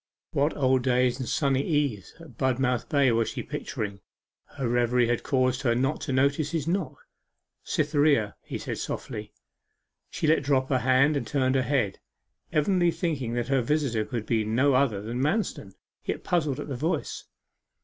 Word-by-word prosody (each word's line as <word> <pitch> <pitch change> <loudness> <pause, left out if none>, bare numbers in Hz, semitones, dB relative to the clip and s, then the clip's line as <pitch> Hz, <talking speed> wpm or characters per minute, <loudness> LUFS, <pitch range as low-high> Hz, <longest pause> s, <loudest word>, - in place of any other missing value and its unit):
What 145 +3 +1
old 130 -2 +3
days 125 0 +2
and 130 - -4
sunny 135 -2 +1
eves 140 - -1
at 165 -1 -13
Budmouth 130 -2 0
Bay 140 -5 +4
was 115 0 +1
she - - -5
picturing? 100 -2 -5 0.5
Her 135 -3 -4
reverie 120 +1 +2
had 120 - +1
caused 130 -1 +1
her 120 -3 +2
not 135 +5 0
to 140 - -3
notice 140 +3 +2
his 160 -2 -2
knock. 180 -1 -2 0.6
'Cytherea!' 145 -8 +2
he - - -6
said - - -5
softly. 110 -4 -5 0.8
She - - -3
let 155 +1 +4
drop 135 -2 +1
her 130 -3 +2
hand, 130 +4 +3
and 125 -5 -2
turned 130 -2 +1
her 135 - +3
head, 125 -6 0 0.5
evidently 175 +3 +2
thinking 160 -8 -2
that 120 +1 -2
her 135 -2 +3
visitor 125 -4 0
could 115 -2 -4
be 110 -1 +1
no 125 +6 +2
other 125 -7 +2
than 120 +4 -3
Manston, 145 - -1 0.3
yet - - -3
puzzled 155 -6 0
at - - -5
the 140 - -4
voice. 160 +8 -2
130 Hz, 170 wpm, -27 LUFS, 120-145 Hz, 0.8 s, Bay